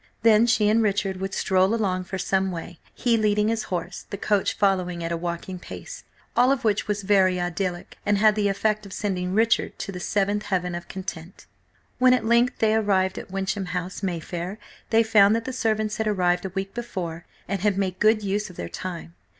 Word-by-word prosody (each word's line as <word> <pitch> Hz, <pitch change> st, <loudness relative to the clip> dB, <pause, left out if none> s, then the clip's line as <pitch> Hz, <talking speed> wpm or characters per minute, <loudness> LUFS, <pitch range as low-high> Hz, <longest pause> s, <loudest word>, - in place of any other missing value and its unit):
Then 225 Hz, 0 st, +6 dB
she 220 Hz, -2 st, +3 dB
and 220 Hz, +2 st, +4 dB
Richard 200 Hz, -2 st, 0 dB
would 190 Hz, +1 st, -4 dB
stroll 190 Hz, +2 st, +2 dB
along 185 Hz, -5 st, -1 dB
for 190 Hz, +1 st, -5 dB
some 190 Hz, +1 st, 0 dB
way, 175 Hz, -1 st, -7 dB, 0.2 s
he 235 Hz, -2 st, +2 dB
leading 210 Hz, 0 st, +2 dB
his 225 Hz, -1 st, -1 dB
horse, 180 Hz, -2 st, -5 dB
the 200 Hz, -, -5 dB
coach 205 Hz, 0 st, +1 dB
following 180 Hz, -3 st, +1 dB
at 165 Hz, -, -3 dB
a -, -, 0 dB
walking 175 Hz, +2 st, -4 dB
pace. -, -, -9 dB, 0.3 s
All 250 Hz, +2 st, +5 dB
of 275 Hz, -, 0 dB
which 210 Hz, -2 st, +1 dB
was 205 Hz, -1 st, -2 dB
very 190 Hz, -2 st, +3 dB
idyllic, 175 Hz, 0 st, -3 dB
and 205 Hz, 0 st, +2 dB
had 215 Hz, +1 st, +5 dB
the 210 Hz, -1 st, +1 dB
effect 215 Hz, +1 st, 0 dB
of 190 Hz, -, -10 dB
sending 185 Hz, -3 st, -2 dB
Richard 225 Hz, +1 st, +2 dB
to -, -, -5 dB
the 180 Hz, -, -6 dB
seventh 205 Hz, +3 st, 0 dB
heaven 180 Hz, -2 st, -1 dB
of 175 Hz, 0 st, -6 dB
content. 185 Hz, -2 st, -7 dB, 0.5 s
When 255 Hz, 0 st, +6 dB
at 250 Hz, -, -2 dB
length 235 Hz, +2 st, +3 dB
they 220 Hz, -1 st, +2 dB
arrived 190 Hz, -4 st, +1 dB
at -, -, -10 dB
Wyncham 195 Hz, +1 st, -2 dB
House, 180 Hz, +3 st, -5 dB
Mayfair, 175 Hz, +1 st, -4 dB, 0.3 s
they 225 Hz, 0 st, +4 dB
found 215 Hz, -1 st, +5 dB
that 230 Hz, 0 st, -2 dB
the 260 Hz, -, -4 dB
servants 215 Hz, -3 st, 0 dB
had 220 Hz, -, -1 dB
arrived 180 Hz, -3 st, +1 dB
a -, -, -2 dB
week 195 Hz, 0 st, -3 dB
before, 175 Hz, -8 st, -5 dB, 0.2 s
and 195 Hz, -1 st, -2 dB
had 205 Hz, -1 st, +1 dB
made 190 Hz, -2 st, -1 dB
good 215 Hz, 0 st, +4 dB
use 205 Hz, +1 st, -1 dB
of 180 Hz, -, -12 dB
their 85 Hz, -, -5 dB
time. 170 Hz, -2 st, -6 dB
195 Hz, 205 wpm, -24 LUFS, 185-215 Hz, 0.5 s, Then